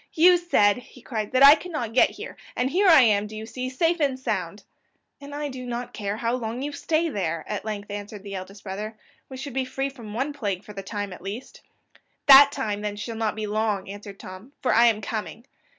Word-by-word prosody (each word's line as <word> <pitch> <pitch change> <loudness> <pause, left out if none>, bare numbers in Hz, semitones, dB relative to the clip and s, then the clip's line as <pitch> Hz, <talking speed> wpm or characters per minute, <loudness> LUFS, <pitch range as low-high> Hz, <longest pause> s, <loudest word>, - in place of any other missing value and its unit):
"You 355 +2 +6
said," 275 - +3
he 250 0 -14
cried, 215 -4 -4
"that 255 +1 +4
I 285 - +11
could 330 +4 -4
not 245 -9 -4
get 255 - +5
here - - -9 0.2
and 255 +2 0
here 390 +4 +3
I 325 -6 +8
am, 210 -3 +3
do 215 - -10
you 220 - -6
see, 255 +2 -5
safe 330 +6 +1
and 275 -3 0
sound?" 195 -5 -3 0.6
"And 285 0 -8
I 295 0 -3
do 260 -2 -7
not 245 0 -5
care 205 -1 -3
how 230 +1 -1
long 245 +1 -3
you 290 - -3
stay 315 +3 0
there," 170 - -3
at 210 0 -4
length 205 -1 -5
answered 205 0 -7
the 200 -1 -8
eldest 195 +1 -8
brother; 210 +3 -6 0.3
"we 260 - -8
should 270 0 -7
be 265 0 0
free 270 +2 -3
from 230 -6 -10
one 275 +5 -1
plague 205 -8 -3
for 210 - -11
the 195 - -6
time 205 0 -5
at - - -12
least." 200 +7 -8 0.6
"That 280 0 +9
time, 215 -8 -3
then, 210 -1 -3
shall 225 +2 -6
not 220 -1 -1
be 215 -1 -3
long," 210 -1 -1
answered 200 -1 -10
Tom, 185 +9 -11
"for 255 - +1
I 235 +1 +6
am 220 -2 +2
coming." 220 +3 -5
225 Hz, 230 wpm, -25 LUFS, 205-270 Hz, 0.6 s, I